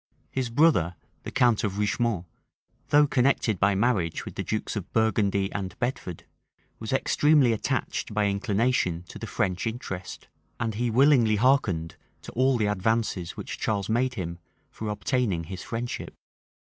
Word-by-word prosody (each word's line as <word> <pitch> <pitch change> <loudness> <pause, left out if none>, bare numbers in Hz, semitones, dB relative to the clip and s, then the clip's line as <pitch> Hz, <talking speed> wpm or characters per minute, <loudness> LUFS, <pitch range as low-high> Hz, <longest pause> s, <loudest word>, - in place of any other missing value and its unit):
His 130 -3 -2
brother, 115 - +3 0.3
the - - -6
count 120 -3 +3
of 100 -2 -2
Richemont, 105 -2 0 0.6
though 150 0 +6
connected 125 -6 +1
by 100 0 +3
marriage 100 -6 0
with - - -7
the - - -4
dukes - - -3
of - - -5
Burgundy 100 -3 +1
and 95 -3 -4
Bedford, 120 - -4 0.5
was 110 - -5
extremely 140 -1 +4
attached 110 - -2
by 105 0 +1
inclination 100 -3 0
to - - -9
the - - -6
French 95 +2 -1
interest; 105 -5 -6 0.3
and 115 -2 -1
he 120 +3 -1
willingly 120 -2 +5
hearkened 105 - +1 0.3
to - - -8
all 130 +1 +2
the 110 - +1
advances 105 -3 -1
which - - -6
Charles 100 -2 -1
made 125 +3 +1
him 85 -3 -5 0.3
for 110 - -5
obtaining 105 -5 0
his 90 +2 -7
friendship. 120 +1 -5
110 Hz, 150 wpm, -26 LUFS, 95-125 Hz, 0.6 s, though